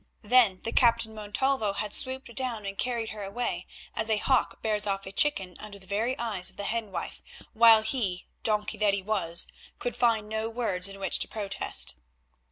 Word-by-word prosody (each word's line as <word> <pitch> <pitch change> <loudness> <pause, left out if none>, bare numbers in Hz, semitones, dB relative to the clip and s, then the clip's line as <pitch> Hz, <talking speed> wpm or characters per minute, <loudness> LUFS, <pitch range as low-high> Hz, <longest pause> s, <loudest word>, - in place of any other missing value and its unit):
Then 220 -4 +4
the 230 - -2
Captain 230 -2 +3
Montalvo 215 +1 -1
had 205 +1 -3
swooped 260 -2 +1
down 235 -5 -2
and 195 0 -4
carried 235 0 -2
her 215 - -7
away, 220 +5 -3 0.3
as 220 - -1
a 220 - +3
hawk 260 +4 +1
bears 210 -1 0
off 195 0 -2
a 190 - -7
chicken 195 -7 +1
under 210 -1 -9
the 190 - -13
very 220 +7 -1
eyes 210 -6 -1
of - - -15
the 205 - -3
hen 220 0 -2
wife, 170 -2 -6 0.3
while 225 -1 +7
he—donkey 215 -1 -2
that 205 -2 +3
he 195 - -4
was—could 200 +4 -1
find 230 -3 +2
no 220 +1 -2
words 210 -6 +1
in 195 0 -8
which 195 - 0
to - - -1
protest. 205 -3 +1
215 Hz, 180 wpm, -28 LUFS, 200-235 Hz, 0.3 s, while